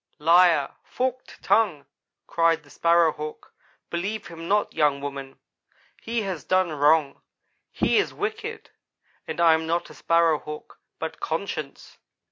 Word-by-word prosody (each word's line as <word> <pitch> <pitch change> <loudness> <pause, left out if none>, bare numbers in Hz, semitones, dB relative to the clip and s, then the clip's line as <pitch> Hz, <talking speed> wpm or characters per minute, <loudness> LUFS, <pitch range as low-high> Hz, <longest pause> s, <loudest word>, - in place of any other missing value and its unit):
"'Liar 165 -2 +4
forked 255 0 -4
tongue,' 180 -11 +2 0.4
cried 165 -1 +1
the 145 - -19
Sparrow 170 -1 +3
hawk. 150 0 -8 0.4
'Believe 200 +5 -3
him 165 0 -8
not, 205 +2 +1
young 145 -2 +2
woman. 140 -1 -7 0.6
He 230 -1 -2
has 185 -7 -4
done 185 -2 +1
wrong. 150 -1 +2 0.5
He - - +2
is - - 0
wicked 440 +2 -5 0.6
and - - -5
I 165 -1 +6
am 160 0 -1
not 170 +1 -1
a - - -11
Sparrow 165 -2 +2
hawk, 150 0 -10 0.2
but - - -5
conscience. - - -5
165 Hz, 135 wpm, -25 LUFS, 150-190 Hz, 0.6 s, I